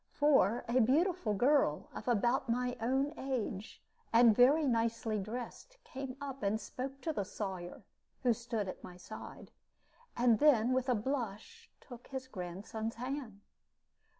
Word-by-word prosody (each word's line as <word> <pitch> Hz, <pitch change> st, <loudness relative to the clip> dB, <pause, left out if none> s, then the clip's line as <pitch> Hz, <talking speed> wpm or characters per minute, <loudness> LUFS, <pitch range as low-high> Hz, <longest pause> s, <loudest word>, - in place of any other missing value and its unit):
For 270 Hz, -7 st, +3 dB
a 240 Hz, +2 st, +2 dB
beautiful 285 Hz, -, +2 dB
girl, 250 Hz, -, +2 dB
of 215 Hz, -, -8 dB
about 240 Hz, +2 st, +2 dB
my 245 Hz, +1 st, 0 dB
own 265 Hz, +5 st, +1 dB
age, 230 Hz, -6 st, -4 dB, 0.3 s
and 230 Hz, -1 st, +6 dB
very 280 Hz, +6 st, +5 dB
nicely 230 Hz, -3 st, 0 dB
dressed, 240 Hz, -, -7 dB
came 270 Hz, -, -7 dB
up 275 Hz, -2 st, -6 dB
and 205 Hz, +2 st, 0 dB
spoke 270 Hz, +3 st, -6 dB
to 320 Hz, -, -2 dB
the 205 Hz, -, -1 dB
Sawyer 190 Hz, -3 st, -6 dB, 0.4 s
(who 245 Hz, -2 st, +4 dB
stood 230 Hz, -3 st, -3 dB
at 185 Hz, -, -7 dB
my 180 Hz, -, -10 dB
side), 215 Hz, +5 st, -10 dB, 0.7 s
and 235 Hz, -2 st, +4 dB
then, 255 Hz, -5 st, +5 dB
with 260 Hz, 0 st, 0 dB
a 250 Hz, -, +4 dB
blush, 250 Hz, -, -4 dB
took 245 Hz, -2 st, -12 dB
his 265 Hz, -1 st, -6 dB
grandson's 210 Hz, +3 st, -5 dB
hand. 250 Hz, -4 st, -5 dB
240 Hz, 145 wpm, -33 LUFS, 215-270 Hz, 0.7 s, and